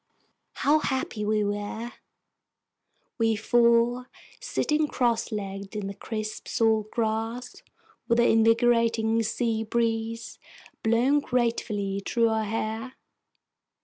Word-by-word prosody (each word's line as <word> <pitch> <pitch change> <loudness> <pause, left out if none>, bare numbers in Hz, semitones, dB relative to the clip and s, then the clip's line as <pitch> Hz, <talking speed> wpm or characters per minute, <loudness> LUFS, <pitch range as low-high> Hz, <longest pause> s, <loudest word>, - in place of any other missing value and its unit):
How 300 +2 +3
happy 260 -7 -2
we 210 0 +1
were, 205 +3 -3 1.3
we 225 -1 +3
four, 235 +2 +3 0.3
sitting 305 -11 0
crosslegged 210 -6 -2
in 210 -2 -3
the 200 - -4
crisp 215 +1 -6
salt 220 -2 +1
grass, 225 +2 -3 0.5
with 235 - +2
the 235 - +4
invigorating 225 0 +3
sea 225 0 -1
breeze 230 0 -2 0.4
blowing 240 +6 +3
gratefully 225 -6 -1
through 230 +1 +2
our 220 -1 0
hair! 225 +3 -3
225 Hz, 100 wpm, -26 LUFS, 215-235 Hz, 1.3 s, the